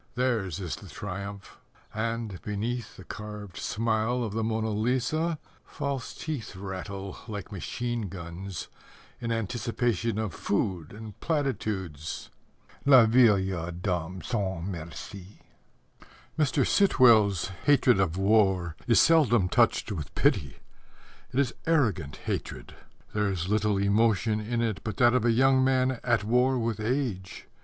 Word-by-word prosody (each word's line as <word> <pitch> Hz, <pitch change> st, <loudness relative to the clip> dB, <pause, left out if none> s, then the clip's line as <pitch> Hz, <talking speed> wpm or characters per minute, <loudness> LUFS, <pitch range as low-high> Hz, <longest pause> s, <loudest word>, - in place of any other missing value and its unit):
Theirs 115 Hz, -, 0 dB
is 90 Hz, -4 st, -4 dB
the -, -, -12 dB
triumph, 100 Hz, 0 st, -7 dB, 0.3 s
And, 110 Hz, -3 st, -3 dB
beneath 110 Hz, +3 st, -4 dB
The 95 Hz, -, -10 dB
carved 105 Hz, -2 st, -8 dB
smile 115 Hz, +2 st, 0 dB
of 110 Hz, -3 st, -4 dB
the 110 Hz, +1 st, -1 dB
Mona 110 Hz, 0 st, -1 dB
Lisa, 130 Hz, +9 st, 0 dB, 0.3 s
False 140 Hz, -2 st, -4 dB
teeth 145 Hz, -, -5 dB
Rattle 95 Hz, +1 st, -6 dB
Like 105 Hz, -3 st, -6 dB
machine 115 Hz, +2 st, -3 dB
guns, 85 Hz, 0 st, -7 dB, 0.5 s
In 115 Hz, -1 st, -3 dB
anticipation 115 Hz, -1 st, -1 dB
Of 110 Hz, -5 st, -2 dB
food 95 Hz, -6 st, -2 dB
and 110 Hz, -1 st, -10 dB
platitudes. 105 Hz, -, -3 dB, 0.5 s
Les 130 Hz, -4 st, +8 dB
Vieilles 100 Hz, -7 st, +3 dB
Dames 90 Hz, -1 st, -3 dB
Sans 95 Hz, -7 st, -2 dB
Merci! 90 Hz, +2 st, -8 dB, 0.9 s
Mr. 145 Hz, -3 st, +2 dB
Sitwell's 110 Hz, -, +4 dB, 0.2 s
hatred 130 Hz, -6 st, +5 dB
of 90 Hz, -3 st, +1 dB
war 95 Hz, -4 st, +2 dB
is 115 Hz, -, +5 dB
seldom 120 Hz, -, +5 dB
touched -, -, +2 dB
with 80 Hz, -8 st, -6 dB
pity. 70 Hz, -3 st, +1 dB, 0.7 s
It 130 Hz, -, 0 dB
is 130 Hz, -4 st, +1 dB
arrogant 115 Hz, -, +1 dB
hatred. -, -, -4 dB, 0.4 s
There 105 Hz, -1 st, +1 dB
is 90 Hz, -1 st, -2 dB
little 105 Hz, -1 st, +2 dB
emotion 105 Hz, +2 st, +2 dB
in 115 Hz, +2 st, -2 dB
it 110 Hz, -4 st, -1 dB
but 110 Hz, -3 st, -4 dB
that 120 Hz, -1 st, +5 dB
of 125 Hz, -2 st, +2 dB
a 120 Hz, -, +4 dB
young 130 Hz, +2 st, +4 dB
man 130 Hz, -1 st, +2 dB
at 120 Hz, -3 st, +2 dB
war 125 Hz, +4 st, +2 dB
with 115 Hz, -3 st, -1 dB
age. 110 Hz, -5 st, -2 dB
110 Hz, 130 wpm, -28 LUFS, 95-120 Hz, 0.9 s, Les